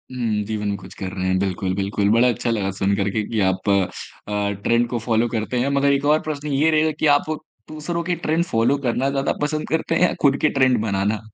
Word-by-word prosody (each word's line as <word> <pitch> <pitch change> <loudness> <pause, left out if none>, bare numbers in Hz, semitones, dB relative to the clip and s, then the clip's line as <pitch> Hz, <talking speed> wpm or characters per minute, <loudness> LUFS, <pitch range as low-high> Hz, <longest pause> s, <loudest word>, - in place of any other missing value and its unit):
हुँ, 110 -4 -1
जीवन 105 -1 -3
में 100 - -1
कुछ 100 - -12
कर 95 - -3
रहे 95 -1 -3
हैं 95 0 +2
बिल्कुल, 95 -1 -1
बिल्कुल 100 +1 0
बड़ा 115 +3 +4
अच्छा 120 0 -1
लगा 105 -4 0
सुनकर 100 +1 0
के 110 +2 -1
कि 115 -2 -1
आप 95 +2 -1
अ, 100 +1 -2
ट्रेंड 120 +1 +2
को 120 - -2
फॉलो 115 0 +2
करते 115 +2 -2
हैं। 130 +3 +1
मगर 140 0 +2
एक 140 +1 0
और 155 - +3
प्रश्न 150 -1 -4
ये 145 +2 +2
रहेगा 155 0 +2
कि 155 - +2
आप - - -7 0.4
दूसरों 170 +2 -4
के 175 0 -1
ट्रेंड 165 0 0
फॉलो 115 +1 +1
करना 125 +2 0
ज़्यादा 140 0 0
पसंद 150 +1 -1
करते 160 +1 0
हैं - - +1
या - - -2
खुद 140 -1 +4
के 155 - +4
ट्रेंड 130 -3 +2
बनाना? 105 0 0
115 Hz, 235 wpm, -21 LUFS, 100-140 Hz, 0.4 s, बड़ा